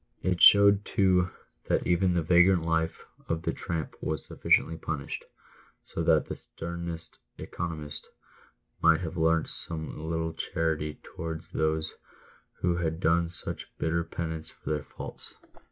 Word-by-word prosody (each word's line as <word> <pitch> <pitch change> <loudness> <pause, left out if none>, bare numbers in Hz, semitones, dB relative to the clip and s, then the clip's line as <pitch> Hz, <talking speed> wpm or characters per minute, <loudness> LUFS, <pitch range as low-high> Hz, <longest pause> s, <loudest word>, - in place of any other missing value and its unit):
It 90 -1 0
showed, 100 0 +8
todf 90 -3 +3 0.4
that - - +1
even 90 +1 +2
the 85 - +2
vagrant 90 +1 +5
life 80 0 -1 0.2
of 80 0 -1
the - - 0
tramp 80 -2 -3
was 80 -3 -2
sufficiently 80 - +2
punished, 75 -3 -4 0.6
so - - -4
that - - +4
the - - -5
sternest 85 0 -5
" - - -49
economist" 80 -4 -5 0.7
might 80 0 +5
have 80 -3 -4
learnt 80 0 +2
some 80 -1 -3
little 80 0 -1
charity 80 -2 -2
towards 80 -1 -6
those 80 0 0 0.7
who 85 -1 +2
had 80 -1 -1
done 85 -1 +2
such 85 -1 -3
bitter 85 +1 0
penance 80 -1 -5
for - - -7
their 75 -1 -1
faults. - - -8
80 Hz, 140 wpm, -29 LUFS, 80-85 Hz, 0.7 s, showed